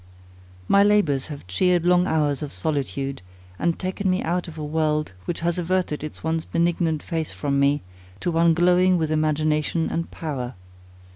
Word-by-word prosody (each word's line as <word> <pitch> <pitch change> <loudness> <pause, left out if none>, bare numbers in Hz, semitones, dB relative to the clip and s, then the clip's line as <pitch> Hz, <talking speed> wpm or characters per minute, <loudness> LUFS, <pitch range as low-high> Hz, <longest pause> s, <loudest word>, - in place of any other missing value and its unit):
My 200 - +5
labours 185 -11 +2
have 145 - -8
cheered 175 - +1
long 180 +1 +4
hours 150 -4 +1
of 150 -2 -4
solitude, 140 -4 -3 0.4
and 170 0 +1
taken 190 +1 -2
me 185 0 +1
out 175 +2 -1
of 160 -1 -9
a 155 - -4
world, 150 -2 0
which 170 - -3
has 170 +1 0
averted 175 -4 -1
its 155 - -7
once 160 0 0
benignant 170 -2 0
face 160 -2 -3
from 140 -1 -1
me, 140 +1 +2 0.4
to 175 - 0
one 165 0 +4
glowing 180 +1 +4
with 160 -2 -1
imagination 155 +1 +1
and 165 - -2
power. 130 -6 -5
160 Hz, 165 wpm, -24 LUFS, 150-175 Hz, 0.4 s, My